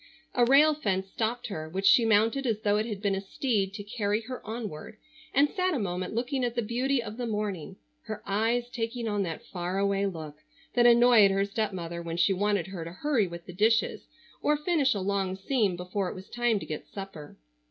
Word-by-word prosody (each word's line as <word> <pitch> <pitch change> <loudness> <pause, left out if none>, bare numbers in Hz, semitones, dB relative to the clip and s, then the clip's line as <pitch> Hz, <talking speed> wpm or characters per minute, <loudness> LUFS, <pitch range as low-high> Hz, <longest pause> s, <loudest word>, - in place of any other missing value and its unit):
A 245 - +3
rail 290 +5 +6
fence 195 -9 -1
stopped 235 +2 -2
her, 155 -5 -5
which 190 +4 -3
she 235 +3 +6
mounted 225 +5 +3
as 220 -2 0
though 205 -1 +2
it 215 +2 0
had 210 -2 -5
been 200 -1 +2
a 195 - -1
steed 200 -1 -1
to 205 - -6
carry 210 0 -1
her 255 +3 -7
onward, 215 -4 -6 0.3
and 285 +2 +4
sat 365 +1 0
a - - 0
moment 185 0 -3
looking 255 +3 -1
at 240 -1 -1
the 240 - 0
beauty 245 +3 0
of 215 0 -7
the 245 -1 -3
morning, 205 -5 -3 0.3
her 215 -1 -6
eyes 225 +4 +1
taking 235 -1 -3
on 205 -2 0
that 165 -4 -4
far 180 +1 -4
away 200 0 +1
look 155 -5 -7 0.4
that 240 -1 +5
annoyed 235 -3 +7
her 195 +1 +1
stepmother 190 -5 -3
when 165 0 -5
she 185 +3 +3
wanted 200 -2 +1
her 190 -3 -6
to 165 - -7
hurry 235 - +1
with 170 0 -9
the 180 - -9
dishes, 220 +4 +1 0.3
or 300 0 +2
finish 300 -5 +2
a - - -1
long 190 -1 -1
seam 200 -1 0
before 180 +2 -3
it - - -7
was 190 0 -10
time 240 -2 +1
to - - -7
get 155 - -6
supper. 195 -7 -9
210 Hz, 215 wpm, -28 LUFS, 190-240 Hz, 0.4 s, annoyed